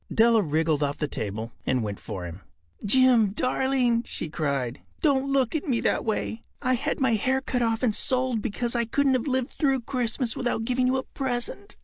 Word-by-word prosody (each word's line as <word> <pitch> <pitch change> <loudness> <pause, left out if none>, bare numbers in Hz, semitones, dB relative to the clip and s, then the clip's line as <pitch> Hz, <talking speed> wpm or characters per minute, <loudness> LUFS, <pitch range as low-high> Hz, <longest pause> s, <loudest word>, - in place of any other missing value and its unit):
Della 225 0 +5
wriggled 155 -2 +1
off 145 0 0
the 150 - -1
table 110 -2 -4
and 130 -2 0
went 100 -2 -4
for 90 -2 -6
him. 85 +3 -8 0.4
“Jim, 235 -2 +4
darling,” 255 0 +1
she 165 - -5
cried, 140 -5 -2 0.2
“don’t 275 -3 +2
look 265 -4 +2
at 315 +2 -2
me 245 -4 +1
that - - +1
way. 220 +1 -2 0.2
I 255 - +1
had 250 - -1
my 260 -4 +3
hair 255 +5 +1
cut 255 -2 -2
off 225 0 0
and 230 -4 +3
sold 255 -1 0
because 235 +4 -2
I 235 -1 +1
couldn’t 275 +4 +2
have 255 +1 0
lived 260 -2 0
through 270 -3 +1
Christmas 245 -1 -2
without 240 -2 -1
giving 250 +1 +1
you 260 +1 +2
a 260 - -2
present. 265 +10 -3
240 Hz, 200 wpm, -26 LUFS, 190-260 Hz, 0.4 s, Della